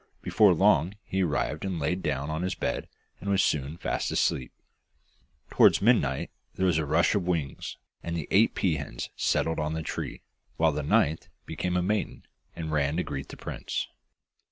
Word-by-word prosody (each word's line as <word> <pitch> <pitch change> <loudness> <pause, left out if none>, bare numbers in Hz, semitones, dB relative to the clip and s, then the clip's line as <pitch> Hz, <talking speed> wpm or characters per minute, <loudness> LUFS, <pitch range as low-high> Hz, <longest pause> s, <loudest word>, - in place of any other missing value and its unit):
Before 100 -5 +5
long 95 -1 +3
he 95 - -1
arrived 80 -2 -1
and 95 -3 -2
laid 90 +6 -1
down 70 -1 -2
on 80 +1 -2
his 95 +1 -1
bed, - - -2 0.3
and 100 - -5
was 100 -1 +3
soon 75 +2 0
fast - - -2
asleep. 65 - 0 1.0
Towards - - +6
midnight 100 - +2 0.2
there 95 - 0
was 85 -4 +3
a 75 - -2
rush 85 +3 +3
of 100 -4 0
wings, 80 -7 -2 0.2
and 85 0 -3
the 80 - -4
eight 110 +4 +4
pea 85 -6 +1
hens 70 -4 -6
settled 80 0 +1
on 75 0 -1
the 80 - -3
tree, - - -5 0.3
while - - +4
the - - -2
ninth 80 +2 +2 0.2
became 90 +2 -2
a 90 - +1
maiden, 105 +3 -2 0.3
and 80 -2 -4
ran 75 0 +1
to 90 - +1
greet 70 -1 -5
the - - -10
prince. - - -4
80 Hz, 180 wpm, -28 LUFS, 75-95 Hz, 1.0 s, Towards